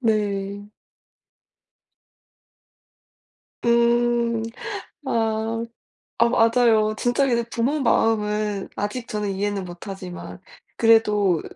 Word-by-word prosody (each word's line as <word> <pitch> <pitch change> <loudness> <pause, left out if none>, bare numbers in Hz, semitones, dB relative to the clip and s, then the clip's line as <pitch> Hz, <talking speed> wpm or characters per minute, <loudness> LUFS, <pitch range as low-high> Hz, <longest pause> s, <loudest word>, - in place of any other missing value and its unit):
네. 205 -3 -1 3.0
음. 235 -1 +2 0.6
아. 225 -1 -1 0.6
아 235 +1 +5
맞아요. 225 -2 +3
진짜 245 +4 +1
근데 235 -2 +1
부모 270 +6 0
마음은 210 -4 +1
아직 230 +4 -3
저는 210 -2 -2
이해는 200 0 -2
못 175 +2 -10
하지만 185 -2 -8 0.4
그래도 210 -6 +4
220 Hz, 155 characters per minute, -23 LUFS, 205-235 Hz, 3.0 s, 아